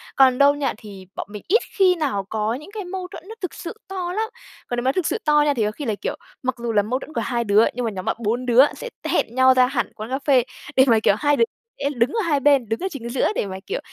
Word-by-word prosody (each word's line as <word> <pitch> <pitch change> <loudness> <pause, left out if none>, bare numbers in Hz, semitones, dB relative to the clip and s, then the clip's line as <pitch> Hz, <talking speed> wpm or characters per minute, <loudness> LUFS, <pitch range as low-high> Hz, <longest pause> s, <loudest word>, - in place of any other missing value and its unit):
Còn 260 -2 +5
đâu 280 +1 +6
nha 290 -1 -1
thì 200 -4 -11
bọn - - -5
mình 210 -1 -8
ít 445 +7 +4 0.2
khi 375 -2 +5
nào 270 - -1
có 220 0 -1
những 300 +10 -8
cái 415 -3 -5
mâu 365 0 -5
thuẫn 330 - -10
nó 445 - -7
thực 365 - -3
sự 340 - -7
to 365 -2 -4
lắm. 440 +3 -1 0.4
Còn 245 - -3
nếu 240 - -1
mà 260 - +3
thực 345 +2 -1
sự - - 0
to 300 -1 +5
nha 290 - +3
thì 235 -5 0
có 210 - 0
khi 285 +7 -7
là, 220 -4 0
kiểu, - - -2 0.3
mặc 260 0 -1
dù 235 -1 -3
là 205 - +4
mâu 240 +6 -2
thuẫn 310 - -11
của - - -1
2 240 -2 -1
đứa, 210 +1 +4
nhưng 250 -1 -3
mà 225 - -1
nhóm 185 -2 -6
bạn - - 0
4 235 +3 -1
đứa 250 +2 +6
sẽ - - -7
t - - -5
hẹn 235 - 0
nhau 260 0 +6
ra 255 0 +5
hẳn 250 -2 -2
quán 215 +2 -7
cà 265 +1 -1
phê 265 -4 +5 0.3
để 265 - +7
mà, 230 -3 +5
kiểu, 210 - +3
2 290 0 +3
đứa - - +5 0.4
sẽ 280 - 0
đứng 235 +1 +2
ở 455 - 0
2 320 -7 +1
bên 275 -5 +3
đứng 225 - -1
ở 380 - -2
chính 235 -6 -6
giữa 245 +1 +1
để - - 0
mà, 190 -1 -6
kiểu, 470 +5 -2
260 Hz, 305 wpm, -22 LUFS, 230-305 Hz, 0.4 s, để